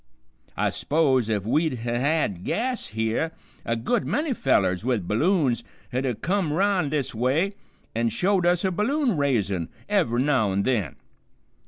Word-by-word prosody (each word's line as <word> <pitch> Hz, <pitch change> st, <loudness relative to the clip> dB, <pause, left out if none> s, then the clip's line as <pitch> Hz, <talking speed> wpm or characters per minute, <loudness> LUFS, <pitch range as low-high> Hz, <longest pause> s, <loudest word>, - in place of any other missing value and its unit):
I -, -, +1 dB
s'pose 135 Hz, -7 st, +1 dB
if 105 Hz, -3 st, -1 dB
we'd 150 Hz, +3 st, +1 dB
ha' 120 Hz, 0 st, -1 dB
had 140 Hz, -, 0 dB
gas 250 Hz, -, -1 dB
here, 110 Hz, +9 st, -1 dB, 0.3 s
a 115 Hz, -, -1 dB
good 160 Hz, -, 0 dB
many 300 Hz, -2 st, 0 dB
fellers 95 Hz, -, +1 dB
with 115 Hz, -8 st, -1 dB
balloons 130 Hz, -, +2 dB, 0.3 s
'd 130 Hz, +2 st, 0 dB
ha' 120 Hz, -4 st, -2 dB
kim 185 Hz, -3 st, 0 dB
'round 185 Hz, -2 st, +1 dB
this 145 Hz, -3 st, -1 dB
way 135 Hz, -, +1 dB, 0.4 s
an' 115 Hz, +1 st, +1 dB
showed 185 Hz, -, +1 dB
us 175 Hz, +1 st, +2 dB
a 190 Hz, -, +1 dB
balloon 240 Hz, -, +1 dB
raisin' 105 Hz, -, 0 dB, 0.2 s
ev'ry 160 Hz, -, +2 dB
now 130 Hz, -9 st, +2 dB
an' 100 Hz, +1 st, +1 dB
then. 105 Hz, -, 0 dB
135 Hz, 155 wpm, -25 LUFS, 115-180 Hz, 0.4 s, balloons